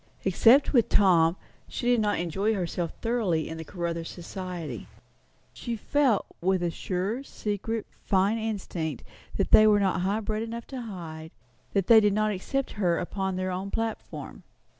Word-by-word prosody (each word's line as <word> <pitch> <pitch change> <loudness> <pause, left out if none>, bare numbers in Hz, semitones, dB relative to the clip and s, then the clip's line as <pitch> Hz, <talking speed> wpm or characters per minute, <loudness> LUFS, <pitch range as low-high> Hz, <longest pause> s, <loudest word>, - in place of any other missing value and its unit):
Except 230 +11 +5
with 240 -4 +4
Tom, 175 -3 +4 0.3
he 245 - -2
did 245 - +4
not 210 -1 +1
enjoy 195 +6 0
herself 175 -2 -2
thoroughly 215 -9 0
in 160 0 -6
the - - -5
Caruthers 170 -1 -4
society. 175 - -6 0.7
She 235 - -4
felt, 255 0 +1 0.2
with 185 0 +1
a 170 - 0
sure, 190 +9 -2
secret, 220 -3 -3 0.2
fine 200 +3 +2
instinct, 185 - -3 0.3
what - - -1
they 215 - +8
were 210 -1 +5
not 190 -2 +1
high 200 +4 0
bred 215 0 -2
enough 230 +1 -5
to 260 - -4
hide; 165 -7 -7 0.4
that 195 -3 +2
they 225 +1 +8
did 210 -2 +3
not 215 +1 +1
accept 265 +8 -2
her 175 -3 +3
as - - -1
upon 190 +1 -3
their 185 0 -2
own 185 +2 -3
platform. 225 +1 -4
195 Hz, 165 wpm, -27 LUFS, 175-220 Hz, 0.7 s, they